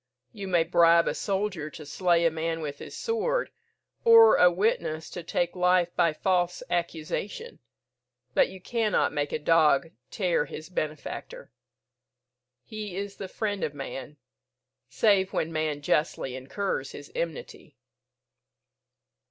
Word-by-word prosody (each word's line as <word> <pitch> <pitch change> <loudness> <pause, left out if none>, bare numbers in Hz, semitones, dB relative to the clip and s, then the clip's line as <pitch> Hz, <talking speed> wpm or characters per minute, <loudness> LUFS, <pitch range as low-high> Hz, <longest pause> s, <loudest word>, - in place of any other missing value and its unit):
You 195 -1 -6
may 175 -3 +3
bribe 170 0 +4
a - - +1
soldier 195 -6 -2
to 155 0 -10
slay 170 +3 +2
a 165 - +4
man 165 +1 -3
with 145 -2 -5
his - - -9
sword, 485 +2 -1 0.5
or 460 -1 +8
a 180 - +7
witness 175 -5 -1
to 175 - -6
take 175 +1 -1
life 180 -1 +2
by 170 -2 +3
false 180 +2 0
accusation, 175 - -3 0.7
but - - +4
you 190 - -10
cannot 220 -1 0
make 145 -1 -1
a - - 0
dog 160 0 +3 0.2
tear 180 -6 0
his 155 +2 -9
benefactor. 180 - -5 1.1
He 215 -4 -7
is 200 0 -5
the 195 - -6
friend 205 0 -3
of 145 - -2
man, 135 0 -7 0.7
save 195 -3 +2
when 165 +1 -1
man 155 -2 -2
justly 145 -4 0
incurs 140 +10 -3
his - - -10
enmity." - - -6
175 Hz, 135 wpm, -27 LUFS, 155-200 Hz, 1.1 s, or